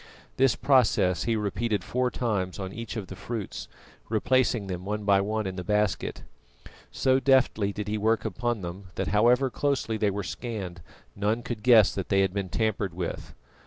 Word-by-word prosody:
This 135 Hz, -2 st, +4 dB
process 110 Hz, -9 st, +3 dB
he 115 Hz, 0 st, +1 dB
repeated 105 Hz, -1 st, -1 dB
four 125 Hz, +4 st, 0 dB
times 100 Hz, -8 st, -2 dB
on 95 Hz, -1 st, -5 dB
each 115 Hz, 0 st, -6 dB
of 105 Hz, -, -4 dB
the -, -, -9 dB
fruits, 115 Hz, -5 st, -5 dB, 0.4 s
replacing 120 Hz, 0 st, +2 dB
them 90 Hz, -2 st, -5 dB
one 105 Hz, +2 st, -3 dB
by 100 Hz, -1 st, +4 dB
one 110 Hz, +2 st, -1 dB
in 95 Hz, 0 st, -4 dB
the 90 Hz, -, -4 dB
basket. 105 Hz, 0 st, -1 dB, 0.7 s
So 130 Hz, 0 st, +2 dB
deftly 130 Hz, -7 st, +3 dB
did 105 Hz, 0 st, -5 dB
he 105 Hz, +1 st, -1 dB
work 110 Hz, +2 st, +1 dB
upon 120 Hz, +1 st, -2 dB
them, 90 Hz, +2 st, -7 dB
that -, -, -2 dB
however 125 Hz, +5 st, +3 dB
closely 135 Hz, -6 st, -1 dB
they 105 Hz, -1 st, +2 dB
were 100 Hz, +1 st, -3 dB
scanned 95 Hz, -4 st, -5 dB, 0.3 s
none 105 Hz, +4 st, 0 dB
could 115 Hz, -3 st, -5 dB
guess 110 Hz, -3 st, +6 dB
that 95 Hz, -, -4 dB
they 100 Hz, -1 st, +3 dB
had 95 Hz, -1 st, +1 dB
been 100 Hz, -2 st, -3 dB
tampered 100 Hz, -2 st, -1 dB
with. 90 Hz, -2 st, -5 dB
105 Hz, 180 wpm, -27 LUFS, 95-120 Hz, 0.7 s, guess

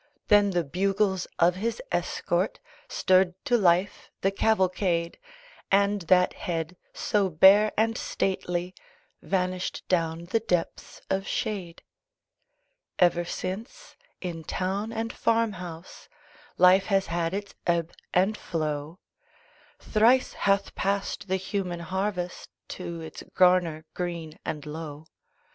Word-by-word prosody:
Then 205 Hz, -1 st, +6 dB
the 175 Hz, -3 st, 0 dB
bugles 190 Hz, +4 st, 0 dB
of 175 Hz, +1 st, +3 dB
his 230 Hz, -, -2 dB
escort -, -, -1 dB, 0.3 s
Stirred 185 Hz, -1 st, +3 dB
to 250 Hz, -4 st, +3 dB
life 185 Hz, -2 st, +2 dB
the 195 Hz, -, +2 dB
cavalcade: 185 Hz, -5 st, +1 dB, 0.5 s
And 200 Hz, +1 st, +3 dB
that 180 Hz, -1 st, +5 dB
head, 165 Hz, 0 st, -4 dB, 0.2 s
so 200 Hz, -2 st, 0 dB
bare 195 Hz, +6 st, +6 dB
and 225 Hz, +1 st, +2 dB
stately 180 Hz, -3 st, -2 dB, 0.5 s
Vanished 185 Hz, -1 st, -2 dB
down 165 Hz, -2 st, 0 dB
the 205 Hz, +6 st, +1 dB
depths 180 Hz, -6 st, -2 dB
of 195 Hz, 0 st, 0 dB
shade. 180 Hz, -5 st, -3 dB, 1.1 s
Ever 175 Hz, -1 st, +4 dB
since, 215 Hz, -, -6 dB, 0.3 s
in 170 Hz, -3 st, -5 dB
town 195 Hz, +7 st, -2 dB
and 225 Hz, 0 st, -3 dB
farm 230 Hz, -1 st, +2 dB
house, 175 Hz, -2 st, -9 dB, 0.5 s
Life 185 Hz, +2 st, +6 dB
has 195 Hz, -2 st, +2 dB
had 170 Hz, +1 st, -1 dB
its 200 Hz, 0 st, -5 dB
ebb 170 Hz, -1 st, +1 dB, 0.2 s
and 190 Hz, +4 st, +2 dB
flow; 155 Hz, -2 st, -3 dB, 0.8 s
Thrice 235 Hz, +4 st, +3 dB
hath 200 Hz, 0 st, +1 dB
passed 200 Hz, +1 st, -2 dB
the 190 Hz, -, +1 dB
human 185 Hz, -2 st, -3 dB
harvest 185 Hz, 0 st, -3 dB, 0.2 s
To 170 Hz, -2 st, -6 dB
its 160 Hz, -, -8 dB
garner 180 Hz, -4 st, +3 dB
green 170 Hz, -3 st, -5 dB
and 150 Hz, -2 st, -4 dB
low. 150 Hz, 0 st, -7 dB
185 Hz, 115 wpm, -27 LUFS, 170-200 Hz, 1.1 s, Then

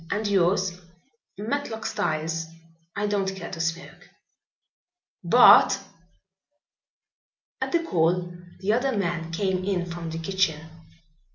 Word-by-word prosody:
And 210 Hz, +2 st, -2 dB
yours?" 185 Hz, -1 st, +1 dB, 0.6 s
"Matlock 225 Hz, -1 st, -4 dB
Styles. 165 Hz, -5 st, -2 dB, 0.5 s
I 205 Hz, -, -1 dB
don't 195 Hz, -2 st, -1 dB
care 185 Hz, -3 st, -8 dB
to 165 Hz, -, -5 dB
smoke." 165 Hz, +2 st, -5 dB, 1.1 s
"Bart!" -, -, +7 dB, 1.8 s
At -, -, -2 dB
the 340 Hz, -1 st, +1 dB
call 175 Hz, -, 0 dB, 0.3 s
the 200 Hz, +2 st, +1 dB
other 250 Hz, 0 st, 0 dB
man 170 Hz, -3 st, -2 dB
came 185 Hz, +1 st, -1 dB
in 185 Hz, -2 st, -1 dB
from 170 Hz, -1 st, -6 dB
the 160 Hz, -, -5 dB
kitchen. 165 Hz, -2 st, 0 dB
185 Hz, 110 wpm, -25 LUFS, 165-205 Hz, 1.8 s, Bart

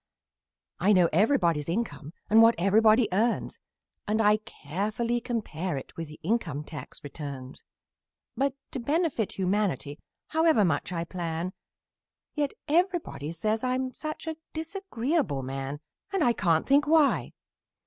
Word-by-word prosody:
I 200 Hz, +4 st, +4 dB
know 180 Hz, -3 st, +5 dB
everybody's 170 Hz, -, +2 dB
income 170 Hz, -6 st, -3 dB
and 220 Hz, +2 st, +6 dB
what 230 Hz, +1 st, +7 dB
everybody 215 Hz, +5 st, +5 dB
earns, 225 Hz, +5 st, 0 dB, 0.5 s
And 215 Hz, +1 st, +1 dB
I 210 Hz, -1 st, +5 dB
carefully 215 Hz, +4 st, -3 dB
compare 190 Hz, -, -3 dB
it 135 Hz, -, -9 dB
with 165 Hz, -1 st, -5 dB
the 155 Hz, +1 st, -12 dB
income 165 Hz, -7 st, -1 dB
tax 150 Hz, 0 st, -9 dB
returns; 140 Hz, -3 st, -7 dB, 0.7 s
But 275 Hz, 0 st, 0 dB, 0.2 s
to -, -, -3 dB
benefit 285 Hz, -, 0 dB
humanity, 185 Hz, -7 st, -1 dB, 0.3 s
however 320 Hz, -9 st, +4 dB
much 160 Hz, +1 st, 0 dB
I 170 Hz, -2 st, -2 dB
plan, 170 Hz, 0 st, -4 dB, 0.8 s
Yet 290 Hz, -2 st, -1 dB
everybody 340 Hz, -, 0 dB
says 215 Hz, +6 st, -1 dB
I'm 255 Hz, 0 st, -1 dB
such 310 Hz, +1 st, -6 dB
a 320 Hz, -1 st, -4 dB, 0.2 s
disagreeable 315 Hz, -, -2 dB
man! 135 Hz, +2 st, -5 dB, 0.3 s
And 390 Hz, -4 st, +1 dB
I 240 Hz, -, +4 dB
can't 165 Hz, -7 st, +2 dB
think 285 Hz, +2 st, +4 dB
why! 310 Hz, -2 st, +3 dB
215 Hz, 130 wpm, -28 LUFS, 165-260 Hz, 0.8 s, what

